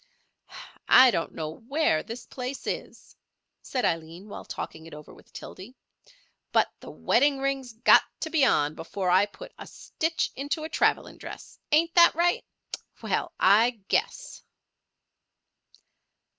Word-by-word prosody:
"I 255 Hz, 0 st, +8 dB
don't 165 Hz, -5 st, -3 dB
know 155 Hz, -1 st, -4 dB, 0.2 s
where 275 Hz, -, +1 dB
this 235 Hz, +1 st, -9 dB
place 255 Hz, +1 st, -7 dB
is," -, -, -6 dB, 0.5 s
said 255 Hz, -2 st, -2 dB
Aileen 165 Hz, +5 st, -3 dB
while -, -, -9 dB
talking 160 Hz, 0 st, -7 dB
it 165 Hz, -, -11 dB
over 150 Hz, 0 st, -13 dB
with -, -, -20 dB
Tildy, 210 Hz, +8 st, -11 dB, 0.8 s
"but -, -, +2 dB
the -, -, -11 dB
wedding 280 Hz, +3 st, +2 dB
ring's 270 Hz, -2 st, -3 dB
got 225 Hz, -, +6 dB, 0.2 s
to 320 Hz, -, -4 dB
be 315 Hz, -4 st, +2 dB
on 150 Hz, -, +2 dB
before 180 Hz, +3 st, -3 dB
I 190 Hz, +3 st, +4 dB
put -, -, -13 dB
a -, -, -9 dB
stitch 325 Hz, +1 st, -3 dB
into 285 Hz, +3 st, -3 dB
a 315 Hz, -, -5 dB
travelling -, -, 0 dB
dress—ain't 330 Hz, +3 st, -2 dB
that 340 Hz, -2 st, +6 dB
right? 345 Hz, +1 st, +1 dB, 0.6 s
Well, -, -, -2 dB
I 225 Hz, +5 st, +4 dB
guess!" 485 Hz, +3 st, -2 dB
250 Hz, 135 wpm, -26 LUFS, 185-300 Hz, 0.8 s, I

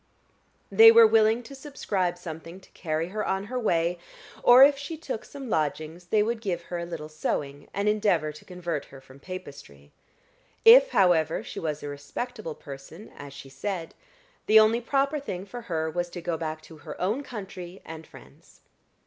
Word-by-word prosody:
They 450 Hz, 0 st, +9 dB
were 460 Hz, 0 st, +8 dB
willing 225 Hz, -, +3 dB
to 255 Hz, -, -11 dB
subscribe 205 Hz, -, -3 dB
something 165 Hz, +1 st, -9 dB
to -, -, -21 dB
carry 160 Hz, 0 st, -3 dB
her 210 Hz, +2 st, -3 dB
on 190 Hz, 0 st, -1 dB
her 250 Hz, +5 st, -4 dB
way, 175 Hz, -5 st, 0 dB, 0.4 s
or 245 Hz, +2 st, +8 dB
if 285 Hz, +1 st, +6 dB
she 285 Hz, +4 st, -7 dB
took 270 Hz, -8 st, -5 dB
some 275 Hz, -2 st, -9 dB
lodgings 155 Hz, -1 st, -2 dB
they 210 Hz, +2 st, +3 dB
would 225 Hz, +1 st, -2 dB
give 175 Hz, -5 st, -3 dB
her 175 Hz, 0 st, -5 dB
a 170 Hz, -, -5 dB
little 165 Hz, -3 st, -6 dB
sewing, 145 Hz, -2 st, -4 dB
and 200 Hz, +1 st, -2 dB
endeavor 200 Hz, -8 st, +1 dB
to 150 Hz, -, -14 dB
convert 175 Hz, -5 st, -5 dB
her 135 Hz, -, -14 dB
from 135 Hz, 0 st, -17 dB
Papistry. 140 Hz, -, -10 dB, 0.7 s
If, -, -, +9 dB
however, 165 Hz, -, +2 dB
she -, -, -7 dB
was 155 Hz, -2 st, -4 dB
a -, -, -5 dB
respectable 155 Hz, -, -6 dB
person, 140 Hz, +8 st, -11 dB
as 145 Hz, -1 st, -10 dB
she 140 Hz, 0 st, -11 dB
said, 175 Hz, +3 st, -5 dB, 0.5 s
the 220 Hz, +1 st, +8 dB
only 220 Hz, +2 st, +4 dB
proper 275 Hz, +4 st, 0 dB
thing 190 Hz, -9 st, -6 dB
for 240 Hz, +4 st, -8 dB
her 160 Hz, -2 st, -1 dB
was 175 Hz, +2 st, -3 dB
to 175 Hz, -, -7 dB
go 170 Hz, 0 st, -2 dB
back 155 Hz, -1 st, -5 dB
to 160 Hz, 0 st, -14 dB
her -, -, -10 dB
own 210 Hz, +9 st, 0 dB
country 195 Hz, -7 st, -8 dB
and 160 Hz, 0 st, -9 dB
friends. -, -, -18 dB
180 Hz, 185 wpm, -26 LUFS, 160-225 Hz, 0.7 s, They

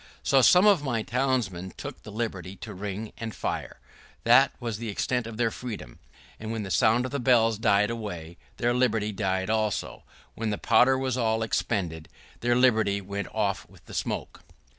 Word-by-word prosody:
So 135 Hz, -1 st, +4 dB
some 180 Hz, -, +6 dB
of 200 Hz, -7 st, +5 dB
my 120 Hz, -5 st, -1 dB
townsmen 115 Hz, -9 st, -1 dB
took -, -, -7 dB
the 105 Hz, -, -10 dB
liberty 100 Hz, -4 st, -4 dB
to 105 Hz, +1 st, -8 dB
ring 105 Hz, +2 st, -5 dB
and 115 Hz, -2 st, -5 dB
fire. -, -, -4 dB, 0.4 s
That -, -, +6 dB
was 115 Hz, -3 st, -4 dB
the 115 Hz, -1 st, -4 dB
extent 125 Hz, +3 st, -1 dB
of 115 Hz, -1 st, -8 dB
their 115 Hz, -1 st, +1 dB
freedom; 110 Hz, -, -7 dB, 0.4 s
and 110 Hz, 0 st, -5 dB
when 115 Hz, -2 st, -3 dB
the 95 Hz, -, -6 dB
sound 115 Hz, +6 st, +3 dB
of 130 Hz, -, -5 dB
the 140 Hz, -, -2 dB
bells 115 Hz, -4 st, +3 dB
died 105 Hz, 0 st, +3 dB
away, 90 Hz, -7 st, -6 dB, 0.2 s
their 120 Hz, +1 st, +1 dB
liberty 115 Hz, -4 st, +1 dB
died 95 Hz, -1 st, -1 dB
away 110 Hz, -, +3 dB
also; 105 Hz, -2 st, -3 dB, 0.3 s
when 115 Hz, -1 st, -3 dB
the 105 Hz, -, -1 dB
powder 130 Hz, +1 st, +4 dB
was 130 Hz, -1 st, -1 dB
all 110 Hz, -1 st, +1 dB
expended, 90 Hz, -8 st, -2 dB, 0.3 s
their 120 Hz, 0 st, +2 dB
liberty 110 Hz, -5 st, +3 dB
went 100 Hz, +1 st, -5 dB
off 105 Hz, -3 st, -1 dB
with -, -, -20 dB
the -, -, -12 dB
smoke. -, -, -4 dB
110 Hz, 185 wpm, -27 LUFS, 100-120 Hz, 0.4 s, some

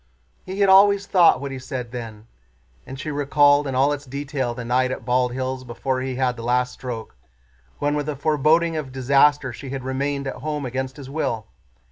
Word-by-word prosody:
"He 190 Hz, +2 st, -3 dB
had 200 Hz, -, +5 dB
always 200 Hz, +1 st, +6 dB
thought 180 Hz, -4 st, +5 dB
what 140 Hz, 0 st, -5 dB
he 135 Hz, -, -5 dB
said 125 Hz, -2 st, -6 dB
then." 115 Hz, -3 st, -8 dB, 0.6 s
And 135 Hz, 0 st, -8 dB
she 150 Hz, -, -4 dB
recalled 145 Hz, 0 st, +3 dB
in 135 Hz, -, -3 dB
all 140 Hz, +3 st, +3 dB
its 145 Hz, -1 st, -7 dB
detail 135 Hz, -2 st, -3 dB
the 125 Hz, -1 st, -6 dB
night 130 Hz, +2 st, +2 dB
at 130 Hz, -, -5 dB
Bald 125 Hz, 0 st, +1 dB
Hills 130 Hz, +1 st, -3 dB
before 130 Hz, +2 st, -3 dB
he 130 Hz, 0 st, -3 dB
had 125 Hz, -1 st, 0 dB
the -, -, -7 dB
last 125 Hz, +1 st, 0 dB
stroke, 120 Hz, -, -7 dB, 0.6 s
when 145 Hz, 0 st, 0 dB
with 150 Hz, 0 st, -2 dB
a 150 Hz, -, -2 dB
foreboding 155 Hz, +3 st, +2 dB
of 150 Hz, -4 st, -4 dB
disaster 135 Hz, +1 st, +3 dB
she 135 Hz, +4 st, -8 dB
had 135 Hz, -1 st, -5 dB
remained 140 Hz, +2 st, -2 dB
at 135 Hz, -, -4 dB
home 150 Hz, -2 st, -3 dB
against 130 Hz, +1 st, -4 dB
his 140 Hz, -3 st, -9 dB
will. 115 Hz, -8 st, -2 dB
135 Hz, 200 wpm, -22 LUFS, 125-145 Hz, 0.6 s, always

